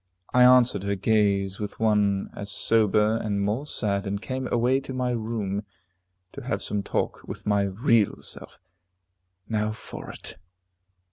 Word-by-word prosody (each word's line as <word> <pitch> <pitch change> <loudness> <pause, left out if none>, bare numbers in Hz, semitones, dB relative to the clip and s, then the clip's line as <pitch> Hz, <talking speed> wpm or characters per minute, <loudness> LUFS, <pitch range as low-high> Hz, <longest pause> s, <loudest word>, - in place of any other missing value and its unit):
I 125 - +6
answered 125 -5 +6
her 100 +1 -1
gaze 100 -1 +1
with 105 -1 -5
one 105 -3 +2
as 100 0 -7
sober, 110 +1 +2
and 100 -2 -1
more 105 +9 -1
sad, 100 -6 -2
and 100 +1 -2
came 130 +3 -4
away 125 +3 +2
to 135 -1 -7
my 125 -1 0
room, 110 -4 -2 0.7
to 140 - -8
have 130 +1 -3
some 105 -1 -2
talk - - -2
with - - -8
my 105 -1 +2
real 110 +2 +2
self. - - -10 0.9
Now 110 -1 -1
for 110 - -9
it. - - -9
105 Hz, 150 wpm, -26 LUFS, 100-120 Hz, 0.9 s, I